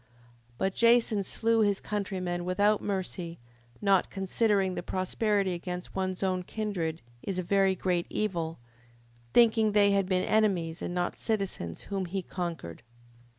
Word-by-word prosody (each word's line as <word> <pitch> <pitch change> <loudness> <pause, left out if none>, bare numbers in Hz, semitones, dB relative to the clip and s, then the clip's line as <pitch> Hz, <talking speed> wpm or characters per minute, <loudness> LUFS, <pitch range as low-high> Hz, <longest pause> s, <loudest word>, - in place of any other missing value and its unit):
5:6. - - -34 0.5
But 190 +6 0
Jason 230 -3 +4
slew 225 +3 +1
his 205 -2 +2
countrymen 185 -4 -3
without 205 +4 +2
mercy, 185 -3 -3 0.5
not 195 -2 +3
considering 195 0 +1
that 175 - -6
prosperity 195 +1 0
against 180 +1 -5
one's 185 0 -2
own 185 -1 +1
kindred 180 -5 -3 0.2
is 195 -2 -4
a 185 - -1
very 195 +1 +3
great 180 -1 0
evil, 170 -6 -2 0.7
thinking 220 - +5
they 205 -1 +5
had 195 -1 +2
been 185 -1 +1
enemies, 185 -7 +1
and 175 - -3
not 175 0 -1
citizens, 195 - -2
whom 195 -2 -3
he 185 +2 -3
conquered. 170 - -5
190 Hz, 145 wpm, -29 LUFS, 180-205 Hz, 0.7 s, thinking